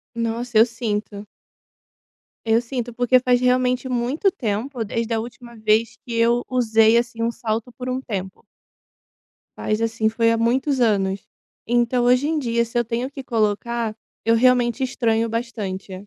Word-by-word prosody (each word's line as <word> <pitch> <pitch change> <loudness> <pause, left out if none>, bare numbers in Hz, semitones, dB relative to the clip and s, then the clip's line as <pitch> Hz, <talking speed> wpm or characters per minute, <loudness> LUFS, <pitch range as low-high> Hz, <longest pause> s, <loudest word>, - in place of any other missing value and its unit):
Nossa, 230 0 -2
eu 225 - +8
sinto. 210 -3 -4 1.2
Eu 225 +1 +3
sinto. 240 -1 -5
Porque 245 +1 +3
faz 250 -1 +2
realmente 250 +1 +1
muito 255 - +1
tempo 235 - -3
desde 230 +2 -2
a 225 - +1
última 235 +1 -9
vez 215 +1 +1
que 235 - -6
eu 235 +1 +2
usei, 225 -2 +4
assim 235 -1 -1
,um 230 - +1
salto 230 +1 -3
por 250 +1 -7
um 255 +1 -2
tempo. 190 -5 -6 1.1
Faz, 215 +1 -1
assim, 225 -1 +1
foi 230 +1 +2
há 230 - +1
muitos 260 +4 +1
anos. 195 -3 +1 0.4
Então, 240 +1 +2
hoje 250 +4 +3
em 315 -1 0
dia, 235 -3 0
se 235 +1 -5
eu 240 - +3
tenho 240 +3 -3
que 275 -1 -8
colocar, 225 0 -1 0.3
eu 230 0 +4
realmente 250 +1 +3
estranho 230 -3 0
bastante. 210 -5 -4
235 Hz, 155 wpm, -22 LUFS, 225-250 Hz, 1.2 s, eu